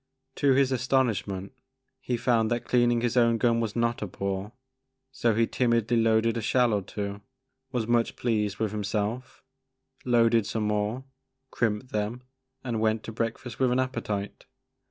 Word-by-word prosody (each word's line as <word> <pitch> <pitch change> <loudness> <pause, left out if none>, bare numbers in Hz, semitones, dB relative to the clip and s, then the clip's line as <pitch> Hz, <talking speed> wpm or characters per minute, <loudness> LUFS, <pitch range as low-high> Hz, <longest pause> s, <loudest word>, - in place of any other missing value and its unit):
To 140 -2 +4
his 135 0 +3
astonishment 115 -7 0 0.5
he 125 - -2
found 115 -2 +2
that 120 0 -1
cleaning 120 -1 +2
his 120 0 0
own 115 -2 +4
gun 115 0 +2
was 110 -3 -2
not 120 0 0
a 105 - -2
bore, 100 +2 -4 0.6
so 115 -4 +1
he 115 +1 +3
timidly 120 -1 +1
loaded 115 0 +3
a - - -2
shell 120 +1 +2
or 100 - +1
two, 100 +1 -5 0.5
was 120 -3 -1
much 120 0 +1
pleased 105 -4 -1
with 110 -2 -1
himself, 105 +5 -3 0.6
loaded 115 -3 +3
some 110 - -2
more, 105 +4 -1 0.5
crimped 115 +2 -1
them, 110 +4 -2 0.4
and 115 -4 -2
went 110 0 +1
to - - -6
breakfast 115 +1 -4
with 130 -1 +3
an 125 - +2
appetite. 115 -6 -3
115 Hz, 155 wpm, -27 LUFS, 105-120 Hz, 0.6 s, To